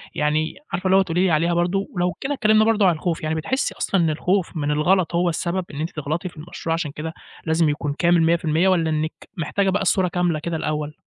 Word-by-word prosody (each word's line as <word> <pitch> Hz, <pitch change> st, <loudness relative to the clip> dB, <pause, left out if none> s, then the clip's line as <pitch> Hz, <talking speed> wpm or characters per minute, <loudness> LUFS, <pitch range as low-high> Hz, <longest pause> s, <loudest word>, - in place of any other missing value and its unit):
يعني 155 Hz, +1 st, 0 dB, 0.2 s
عارفة 185 Hz, -, -2 dB
اللي 190 Hz, +1 st, +5 dB
هو -, -, +6 dB
تقولي 180 Hz, -1 st, 0 dB
لي 185 Hz, -, +2 dB
عليها 165 Hz, +2 st, +2 dB
برضه، 180 Hz, +3 st, 0 dB
ولو 175 Hz, 0 st, 0 dB
كده 280 Hz, +2 st, -1 dB
اتكلِّمنا 215 Hz, -4 st, +3 dB
برضه 220 Hz, -2 st, +3 dB
عن 175 Hz, -, +3 dB
الخوف، 165 Hz, +1 st, -3 dB
يعني 155 Hz, +1 st, -1 dB
بتحسّي 260 Hz, -, -1 dB
أصلًا 195 Hz, -, +1 dB
إن 165 Hz, -, +2 dB
الخوف 180 Hz, +3 st, 0 dB
من 145 Hz, -1 st, -1 dB
الغلط 170 Hz, +3 st, +2 dB
هو 175 Hz, +1 st, +2 dB
السبب 175 Hz, +2 st, -2 dB
إن 145 Hz, -, -6 dB
أنتِ 160 Hz, -, -2 dB
تغلطي 155 Hz, +5 st, -3 dB
في 165 Hz, -, -20 dB
المشروع 165 Hz, +1 st, -4 dB
عشان 165 Hz, -3 st, -2 dB
كده 160 Hz, +2 st, -6 dB, 0.3 s
لازم 160 Hz, -1 st, +2 dB
يكون 145 Hz, -1 st, -2 dB
كامل 170 Hz, -1 st, +4 dB
100% 165 Hz, +1 st, +2 dB
والّا 170 Hz, -4 st, +2 dB
إنِّك 155 Hz, 0 st, -3 dB
محتاجة 190 Hz, +4 st, 0 dB
بقى 190 Hz, -, 0 dB
الصورة 190 Hz, 0 st, +2 dB
كاملة 175 Hz, -2 st, 0 dB
كده 170 Hz, +2 st, -3 dB
الأول؟ 150 Hz, -1 st, -3 dB
170 Hz, 230 wpm, -22 LUFS, 155-185 Hz, 0.3 s, هو